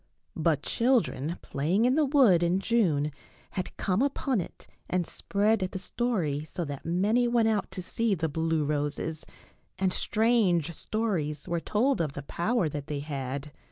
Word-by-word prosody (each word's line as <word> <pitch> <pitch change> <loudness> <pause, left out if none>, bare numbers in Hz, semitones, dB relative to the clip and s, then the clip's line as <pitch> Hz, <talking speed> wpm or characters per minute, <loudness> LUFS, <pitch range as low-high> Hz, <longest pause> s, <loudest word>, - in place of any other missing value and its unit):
But 155 -2 +1
children 225 - +1
playing 170 +11 +1
in 250 - +4
the 305 +1 +3
wood 255 - +5
in 175 +1 +2
June 175 -10 +1 0.4
had 185 - -5
come 190 +3 +1
upon 270 -5 +1
it - - -10 0.2
and 180 -1 +1
spread 210 +5 +1
the 185 0 -3
story, 185 -8 -1
so 170 +2 -5
that 140 -2 -6
many 205 +9 +2
went 235 -2 +3
out 215 -2 0
to 185 - -6
see 225 +2 0
the 160 -2 -1
blue 160 0 0
roses, 150 +2 -2 0.5
and 190 -1 +1
strange 210 -8 +2
stories 165 -8 -2
were 170 0 0
told 230 - +1
of 150 -4 -2
the 145 - -6
power 195 - 0
that 145 -1 -5
they 145 -2 -3
had. 140 0 -4
180 Hz, 160 wpm, -28 LUFS, 150-225 Hz, 0.5 s, wood